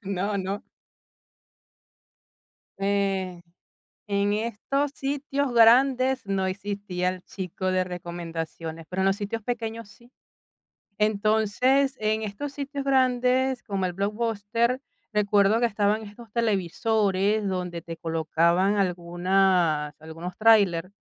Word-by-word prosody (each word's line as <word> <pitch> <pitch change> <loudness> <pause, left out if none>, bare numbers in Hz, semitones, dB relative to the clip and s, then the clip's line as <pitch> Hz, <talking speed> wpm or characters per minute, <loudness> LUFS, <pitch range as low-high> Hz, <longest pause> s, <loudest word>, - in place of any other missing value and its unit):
No, 200 +1 -1
no. 195 +1 -3 2.2
En 195 -3 -1 0.7
en 200 0 +1
estos 235 +6 -1
sitios 280 -1 -2
grandes 255 +2 +5
no 195 -1 -1
existía 190 -2 -2
el 185 -1 -7
chico 185 0 -4
de 185 0 +1
recomendaciones, 165 -2 -6
pero 190 +1 -2
en - - +2
los 195 +1 +3
sitios 210 +2 -4
pequeños 230 -2 -4
sí. 240 +1 -20 0.9
Entonces, 220 +6 +2
en 215 +1 0
estos 215 +8 -5
sitios 280 0 -5
grandes, 255 -1 +2
como 195 -2 -2
el 180 - -1
Blockbuster, 225 +4 -1 0.3
recuerdo 210 +1 +3
que 240 - +3
estaban 210 0 +1
estos 220 +1 -12
televisores 210 -1 +1
donde 180 -3 -3
te 165 -1 -8
colocaban 170 +4 +1
algunas 175 -3 +1
algunos 165 +3 -8
tráiler 200 -6 +4
200 Hz, 110 wpm, -26 LUFS, 185-230 Hz, 2.2 s, grandes